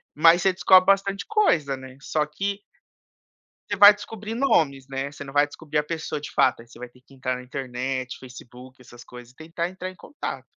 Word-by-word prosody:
mas 165 +3 +5
você 190 0 +2
descobre 185 0 +5
bastante 195 0 +1
coisa, 160 - +2
né, 130 0 -12
só 150 +2 -1
que 195 +7 -4 1.1
você 205 - -2
vai 205 +1 +10
descobrir 215 +1 -8
nomes, 150 - +1
né, 135 +1 -4
você 145 0 -10
não 135 - -10
vai 145 0 +4
descobrir 150 +1 -5
a - - +2
pessoa 160 -1 -5
de 150 - -8
fato 130 -2 +2
aí 115 - -16
você 120 - -16
vai 125 - -8
ter 125 +1 -23
que 135 +1 -21
entrar 130 -1 -3
na 125 - -9
internet, 130 0 -5
Facebook, 125 0 -13
essas 120 -1 -14
coisas 125 0 -13
e - - -40
tentar 165 +2 -4
entrar 185 0 -7
em 185 - -16
contato. 290 - -7
145 Hz, 210 wpm, -24 LUFS, 130-185 Hz, 1.1 s, vai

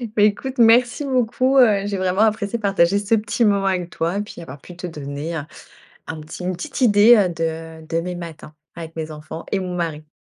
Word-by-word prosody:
Bah, 210 - +2
écoute 250 +6 0
merci 240 +4 +4
beaucoup, 255 +1 +1
heu, 205 -5 +4
j'ai 200 -1 -2
vraiment 185 +2 0
apprécié 220 +1 +1
partager 195 -1 +2
ce 205 +2 +1
petit 225 +2 0
moment 200 -1 +2
avec 180 -2 -1
toi 170 +4 -2
et 205 - 0
puis 205 - -9
avoir 140 -3 -10
pu 180 - -12
te 180 +1 -7
donner, 150 +1 -6
heu, - - -3 0.7
un 160 -1 -6
petit 160 +3 -9
une 185 +1 -1
petite 270 - -6
idée, 220 0 +7
heu, 195 -4 +3
de 165 -1 -5
de 165 +1 -1
mes 180 +1 -5
matins 160 -3 -9 0.2
avec 165 -1 -8
mes 160 -1 -5
enfants 155 +2 -8
et 200 - +1
mon 180 -1 -4
mari. 155 -3 -4
185 Hz, 215 wpm, -21 LUFS, 165-215 Hz, 0.7 s, idée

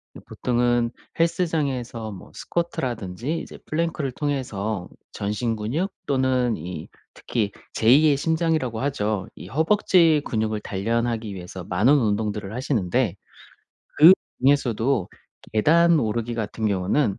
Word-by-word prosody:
이 - - -9
보통은 120 -1 +1 0.3
헬스장에서 140 -10 -1
뭐 95 - -11
스쿼트라든지 130 - -3
이제 - - -9
플랭크를 155 -4 -1
통해서 110 -10 -3 0.2
전신 105 +3 -2
근육 140 - -2 0.2
또는 130 -3 +1
이 80 -1 -7 0.3
특히 105 -4 -2 0.2
제2 130 +8 +5
의 145 -2 +3
심장이라고 160 -7 0
하죠. 110 -8 -1
이 - - -10
허벅지 165 -1 +3
근육을 110 -1 -1
단련하기 115 +1 -2
위해서 90 0 -8
많은 105 +10 +3
운동들을 105 -5 0
하시는데 120 - 0 0.8
그중에서도 135 - +4 0.4
계단 165 +9 +4
오르기 115 0 -1
같은 110 0 -3
경우는 100 +4 +1
120 Hz, 285 characters per minute, -24 LUFS, 105-145 Hz, 0.8 s, 제2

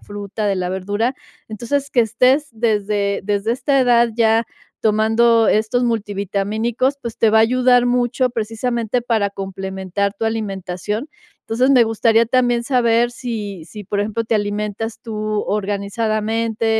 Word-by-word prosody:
fruta, 205 +1 -5
de 200 - +1
la 180 -1 -2
verdura. 205 +7 -1 0.3
Entonces, 270 +6 -3
que 245 - +3
estés 255 +6 +2
desde 210 -3 0
desde 205 +2 0
esta 275 +2 +1
edad 240 -2 +4
ya 225 0 +3 0.4
tomando 225 +1 +3
estos 220 +3 +1
multivitamínicos, 220 +4 -1
pues 235 -3 -6
te 225 - +4
va 220 - +4
a - - +6
ayudar 245 +1 +4
mucho, 250 +1 +1
precisamente, 230 +1 -2
para 220 -4 0
complementar 190 0 -3
tu 225 - -4
alimentación. 210 - -3 0.4
Entonces, 250 +4 +1
me 255 -3 +6
gustaría 225 +1 +2
también 245 -1 +2
saber 240 -2 +2
si 210 -8 -6
si, 210 +3 -10
por 205 +2 -2
ejemplo, 220 +2 -2
te 225 - -1
alimentas 210 +1 -3
tú 225 -2 -7 0.3
organizadamente, 215 +2 -1
225 Hz, 140 wpm, -19 LUFS, 205-240 Hz, 0.4 s, a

